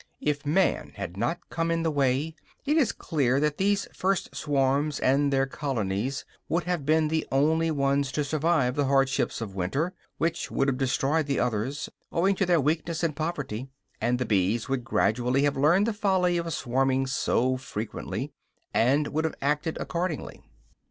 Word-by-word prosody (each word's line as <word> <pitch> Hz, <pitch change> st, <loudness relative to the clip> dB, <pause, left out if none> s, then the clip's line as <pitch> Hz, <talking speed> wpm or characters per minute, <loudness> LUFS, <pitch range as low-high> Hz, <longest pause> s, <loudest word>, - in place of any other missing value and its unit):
If 145 Hz, -1 st, -1 dB
man 185 Hz, +6 st, +1 dB
had 90 Hz, -, -5 dB
not 120 Hz, -, -2 dB
come 165 Hz, 0 st, -1 dB
in 165 Hz, 0 st, 0 dB
the 160 Hz, -, +1 dB
way, 140 Hz, +2 st, +1 dB, 0.3 s
it 295 Hz, +2 st, +2 dB
is 295 Hz, -8 st, +3 dB
clear 135 Hz, -4 st, 0 dB
that 150 Hz, 0 st, 0 dB
these 200 Hz, +1 st, +1 dB
first 190 Hz, 0 st, -1 dB
swarms 140 Hz, +1 st, +1 dB
and 140 Hz, +2 st, +2 dB
their 135 Hz, 0 st, +3 dB
colonies 130 Hz, -1 st, -2 dB, 0.2 s
would 170 Hz, +3 st, +1 dB
have 175 Hz, -6 st, -2 dB
been 155 Hz, 0 st, +4 dB
the 160 Hz, +1 st, -1 dB
only 160 Hz, +4 st, +3 dB
ones 140 Hz, -2 st, +1 dB
to 150 Hz, -, 0 dB
survive 150 Hz, -3 st, +1 dB
the 145 Hz, +1 st, +1 dB
hardships 135 Hz, -2 st, +1 dB
of 105 Hz, -4 st, -5 dB
winter, 135 Hz, -, -1 dB, 0.2 s
which 165 Hz, +1 st, -1 dB
would 135 Hz, -, +1 dB
have 130 Hz, -1 st, -2 dB
destroyed 140 Hz, +3 st, +1 dB
the 140 Hz, -, 0 dB
others, 125 Hz, +5 st, -1 dB, 0.2 s
owing 190 Hz, +4 st, +2 dB
to 195 Hz, -, +1 dB
their 175 Hz, -2 st, +4 dB
weakness 160 Hz, +3 st, -1 dB
and 160 Hz, -3 st, 0 dB
poverty; 140 Hz, -6 st, -3 dB, 0.3 s
and 120 Hz, +2 st, +2 dB
the 125 Hz, -, -1 dB
bees 105 Hz, +3 st, +1 dB
would 135 Hz, -2 st, -1 dB
gradually 125 Hz, +4 st, +1 dB
have 145 Hz, -1 st, +2 dB
learned 170 Hz, +9 st, +4 dB
the 230 Hz, -, 0 dB
folly 190 Hz, -4 st, +2 dB
of 170 Hz, 0 st, -3 dB
swarming 135 Hz, 0 st, +1 dB
so 130 Hz, -1 st, +1 dB
frequently, 115 Hz, 0 st, -5 dB, 0.4 s
and 140 Hz, +6 st, +3 dB
would 155 Hz, +2 st, -1 dB
have 160 Hz, -, -2 dB
acted 150 Hz, +3 st, 0 dB
accordingly. 170 Hz, -2 st, -3 dB
145 Hz, 170 wpm, -27 LUFS, 130-160 Hz, 0.4 s, been